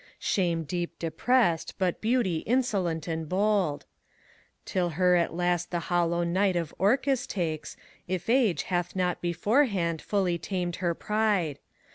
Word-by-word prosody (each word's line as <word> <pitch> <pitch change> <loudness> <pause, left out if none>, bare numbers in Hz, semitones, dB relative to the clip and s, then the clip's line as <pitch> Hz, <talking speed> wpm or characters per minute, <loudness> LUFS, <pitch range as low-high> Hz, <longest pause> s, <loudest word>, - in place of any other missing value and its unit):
Shame 170 -4 0
deep 175 +3 -4
depressed, 175 +1 +1
but 185 -2 -1
Beauty 220 -7 +1
insolent 195 - 0
and 160 -2 -3
bold. 195 -5 +1 0.8
Till 180 -2 0
her 180 -1 +4
at 170 -1 +1
last 175 0 0
the 175 - -1 0.2
hollow 170 0 +2
night 185 +2 +1
of 170 -3 -2
Orcus 255 +6 +2
takes, 160 -5 -3 0.3
If 180 -1 -3
Age 230 -6 +3
hath 175 -1 -2
not 180 -1 0
beforehand 175 - +1
fully 185 -4 0
tamed 180 -2 -3
her 175 -2 -1
pride. 210 -9 0
180 Hz, 135 wpm, -28 LUFS, 170-205 Hz, 0.8 s, her